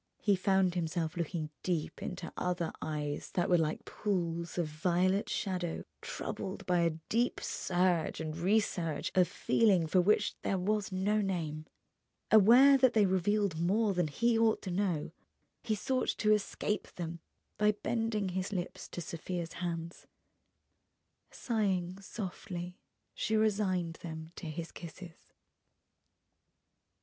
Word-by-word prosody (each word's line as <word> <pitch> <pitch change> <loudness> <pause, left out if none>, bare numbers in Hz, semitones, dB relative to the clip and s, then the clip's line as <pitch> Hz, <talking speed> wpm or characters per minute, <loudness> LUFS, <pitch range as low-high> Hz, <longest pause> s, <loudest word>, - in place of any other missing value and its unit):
He 205 -2 +3
found 190 -1 +2
himself 165 -1 -2
looking 165 -2 -3
deep 170 -4 -2
into 180 -2 -5
other 180 -2 -1
eyes 150 -2 -3
that 175 - +2
were 175 - +6
like 155 -1 -1
pools 170 -4 -2
of 175 - +1
violet 180 +5 +1
shadow 180 -4 -2 0.2
troubled 190 +1 -5
by 180 -1 +2
a 165 -2 +1
deep 240 +2 +1
surge 175 -2 0
and 155 -1 -3
resurge 175 -2 0
of 180 -1 +4
feeling 195 -7 +3
for 180 +4 +3
which 210 +4 +3
there 195 - 0
was 205 +2 0
no 200 +3 +1
name. 160 -6 -3 0.6
Aware 245 +6 +8
that 260 -2 +5
they 215 -2 +5
revealed 190 -1 +1
more 200 +5 +2
than 175 -3 +1
he 230 +10 +2
ought 225 -1 +3
to 185 - -4
know, 175 -5 -1 0.5
he 220 -2 0
sought 255 +6 -1
to 215 -1 +4
escape 210 0 -1
them 170 -1 -5 0.4
by 210 0 +5
bending 220 -2 -1
his 185 +2 -2
lips 180 -3 -4
to 175 - -6
Sofia's 170 +1 -5
hands. 170 -1 -5 1.2
Sighing 190 -6 -1
softly, 180 -3 -6 0.4
she 220 - 0
resigned 190 -6 +1
them 160 -1 -7
to 170 - -6
his 165 +2 -5
kisses. 170 0 -11
180 Hz, 135 wpm, -32 LUFS, 170-205 Hz, 1.2 s, Aware